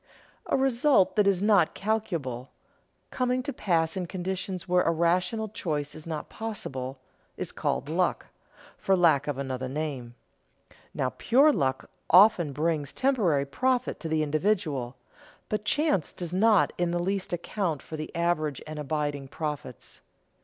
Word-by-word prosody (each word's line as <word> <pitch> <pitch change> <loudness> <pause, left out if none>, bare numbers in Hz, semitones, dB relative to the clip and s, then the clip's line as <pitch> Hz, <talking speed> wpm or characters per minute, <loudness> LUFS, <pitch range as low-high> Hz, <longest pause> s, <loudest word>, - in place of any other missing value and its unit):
A - - +2
result 265 -4 +3
that 210 -2 +3
is 195 -1 +2
not 200 -6 +4
calculable, 170 - -2 0.6
coming 255 0 0
to 285 - -4
pass 165 -7 0
in 180 -2 -3
conditions 185 0 -4
where 180 0 +3
a - - +1
rational 180 +7 +1
choice 150 -8 -3
is 155 +1 -11
not 155 -2 -4
possible, 135 - -5 0.4
is - - -4
called - - -2
luck, - - 0 0.5
for 195 - +2
lack 160 -6 +3
of 145 -3 -2
another 130 -1 -3
name. 135 -5 -4 0.8
Now 130 - -1
pure 280 +6 +4
luck 130 - -1 0.2
often 180 -4 +6
brings 150 -1 -1
temporary 200 - +2
profit 250 - 0
to 165 - -5
the 155 0 +1
individual, 150 - 0 0.5
but 210 0 -2
chance 295 - +1
does 175 -1 -5
not 210 +1 +4
in 175 -1 +1
the 175 - 0
least 190 +2 -2
account 175 -3 -2
for 160 - -7
the 155 0 -5
average 165 -4 0
and 155 0 -7
abiding 145 -1 -2
profits. 150 0 -6
170 Hz, 145 wpm, -27 LUFS, 150-205 Hz, 0.8 s, often